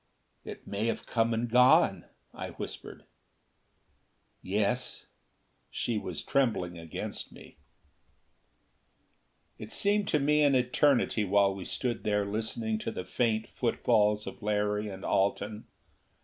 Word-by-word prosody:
"It - - -9
may 105 +3 -2
have 115 - -2
come 115 0 +1
and 115 +1 0
gone," 125 +2 +5 0.3
I - - -6
whispered. - - -7 1.4
"Yes." 105 +6 -1 0.6
She 115 -3 -2
was - - -6
trembling 110 -10 0
against 80 -1 -6
me. - - -15 2.0
It 110 - -8
seemed 205 0 +1
to 155 - +2
me 150 +2 +3
an 145 -2 +4
eternity 125 -2 +2
while 100 0 +3
we 95 -2 -7
stood 120 -3 -3
there 105 -1 +1
listening 110 +1 -2
to 115 - -4
the 90 - -6
faint 110 -3 0
footfalls 105 -3 +1
of - - -8
Larry 105 0 0
and 95 -1 -8
Alten. 100 +2 0
110 Hz, 120 wpm, -29 LUFS, 105-125 Hz, 2.0 s, gone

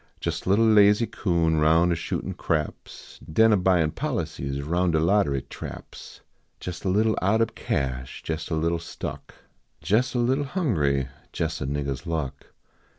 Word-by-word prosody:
Jes - - -3
a - - +1
little 105 +4 +4
lazy 105 0 +5
coon 85 -7 0
roiin 80 +3 +4
a - - +2
shootin - - -3
craps, 75 -2 -4
Den 110 +6 +5
a - - +6
buyin 90 -4 +2
policies 70 -1 -3
roun 85 +4 +1
de 80 -2 +2
lottery 80 -6 +2
traps; - - -10 0.4
Jes 90 -2 -6
a 95 - 0
little 110 +3 +2
out 100 +4 +2
ob 115 - +1
cash, 65 -1 -3
jes 80 0 -3
a 80 - 0
little 85 +1 0
stuck; - - -7 0.4
Jes 105 - +1
a - - +2
little 130 +4 +1
hungry, 80 - 0 0.3
jes - - -2
a 65 - -2
niggah 70 0 -2
s 65 - -6
luck. 70 -5 -3
85 Hz, 165 wpm, -25 LUFS, 75-105 Hz, 0.4 s, a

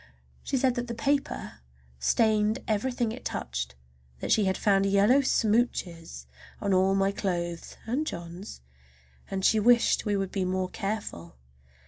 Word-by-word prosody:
Then 60 0 -29
she 270 - 0
said 255 0 +2
that 245 0 -3
the 235 - -4
paper 280 +3 -1 0.4
stained 215 - +2
everything 235 +1 0
it 250 +3 -8
touched, 60 0 -4 0.4
that - - -3
she 215 - +4
had 190 0 +1
found 195 -1 +3
yellow 200 +7 +5
smooches 210 - 0 0.3
on 200 - 0
all 190 +1 +3
my 195 0 +2
clothes 175 -4 -3
and 265 +7 -1
John's, 175 - -7 0.7
and 190 -1 -2
she 220 - +4
wished 235 +2 +4
we 205 -1 0
would 195 -1 -2
be 195 - -1
more 185 0 -1
careful! 195 - -5
200 Hz, 150 wpm, -28 LUFS, 175-230 Hz, 0.7 s, yellow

